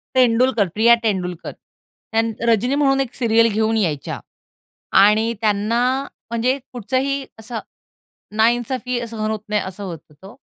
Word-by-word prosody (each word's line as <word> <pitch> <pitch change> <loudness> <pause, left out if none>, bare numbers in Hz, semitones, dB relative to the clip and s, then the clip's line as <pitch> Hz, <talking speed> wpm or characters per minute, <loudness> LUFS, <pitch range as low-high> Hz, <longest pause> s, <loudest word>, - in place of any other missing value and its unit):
तेंडुलकर, 245 -3 +3
प्रिया 230 +3 +5
तेंडुलकर. 180 -5 -2
त्यान 225 0 -5 0.2
रजनी 235 +4 +2
म्हणून 275 -2 +2
एक 255 -3 -4
सीरियल 230 -2 +3
घेऊन 220 +1 +1
यायच्या 155 -9 -2 0.8
आणि 215 +3 +4
त्यांना 215 +2 +1 0.5
म्हणजे 245 +3 +1 0.2
कुठचाही 265 +4 -1
असं 225 +1 -5 0.8
नाइंसाफ़ी 240 +2 0
सहन 220 -1 -3
होत 220 - -2
नाही, 210 0 +1
असं 190 +2 -7
होत 175 -4 -6
तो. 190 +8 -15
225 Hz, 125 wpm, -20 LUFS, 210-245 Hz, 0.8 s, प्रिया